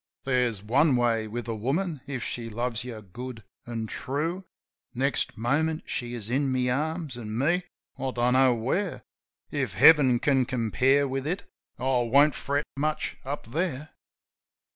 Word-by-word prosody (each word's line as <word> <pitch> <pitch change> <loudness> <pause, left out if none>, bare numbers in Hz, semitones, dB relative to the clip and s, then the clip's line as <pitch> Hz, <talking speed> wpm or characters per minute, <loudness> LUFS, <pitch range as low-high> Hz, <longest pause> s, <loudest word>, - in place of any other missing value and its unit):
There's 125 -6 +1
one 135 +6 +3
way 115 -2 +1
with 120 +2 -5
a 115 - -1
woman 140 - -1
if 130 -4 -4
she 115 -1 -4
loves 120 0 -2
you 120 -3 -7
good 120 +3 -8 0.2
an' 115 -2 -3
true. 160 - -3 0.5
Next 135 +1 0
moment 155 +8 0
she 120 0 -3
is 110 -3 -6
in 135 +3 +1
my 125 -1 +1
arms; 155 +1 -2
an' 110 -2 -5
me? 175 +8 +1 0.3
I 135 0 -1
don't 125 0 +1
know 130 -1 +5
where. 165 - -2 0.5
If - - -2
Heaven 140 -6 +7
can 135 0 +2
compare 130 +3 +2
with 135 +1 -3
it 180 +5 -2 0.3
I - - -8
won't 130 +3 +4
fret 140 +1 -1
much 150 +2 -2
up 135 -4 -5
there. 155 -1 -2
130 Hz, 155 wpm, -27 LUFS, 120-145 Hz, 0.5 s, Heaven